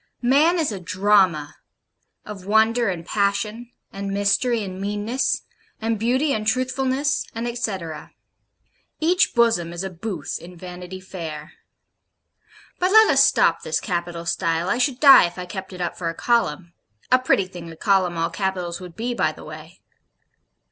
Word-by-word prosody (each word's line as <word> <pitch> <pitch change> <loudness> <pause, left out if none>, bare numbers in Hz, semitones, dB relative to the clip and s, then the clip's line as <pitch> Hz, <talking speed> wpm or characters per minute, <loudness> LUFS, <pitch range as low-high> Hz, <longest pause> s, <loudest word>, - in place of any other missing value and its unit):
Man 295 +8 +4
is 315 -7 0
a 200 - -5
Drama 185 -5 +2 0.7
of 205 -3 -8
Wonder 220 +2 +3
and 170 -3 -4
Passion, 210 +5 -1 0.2
and 195 0 -5
Mystery 205 +4 +1
and 190 -1 -7
Meanness, 210 +6 -1 0.4
and 225 -1 -1
Beauty 260 +6 +1
and 215 0 -3
Truthfulness, 260 +4 0
and 230 +1 -3
Etcetera. 190 -10 -4 0.9
Each 355 +1 +2
Bosom 225 -8 +2
is 175 +2 -5
a 190 - -5
Booth 180 -3 -5
in 180 +1 -12
Vanity 180 +1 -8
Fair. 160 -5 -8 1.3
But 365 - +2
let 440 +1 +7
us - - +6
stop - - +3
this - - -1
capital 175 -3 -4
style, 165 0 0
I 240 - 0
should 255 0 0
die 275 - +8
if 175 - -11
I 180 - -5
kept 190 +1 -7
it 180 -1 -8
up 175 - -2
for 170 -2 -3
a 165 - -5
column 175 -8 0 0.4
(a 255 - +6
pretty 255 -6 +2
thing 175 -2 -10
a - - -11
column 185 -2 +1
all 165 0 -1
capitals 185 -3 -3
would 180 -2 -10
be, 245 +2 -3
by 155 - +1
the - - -13
way). 155 +3 -11
195 Hz, 160 wpm, -22 LUFS, 175-235 Hz, 1.3 s, die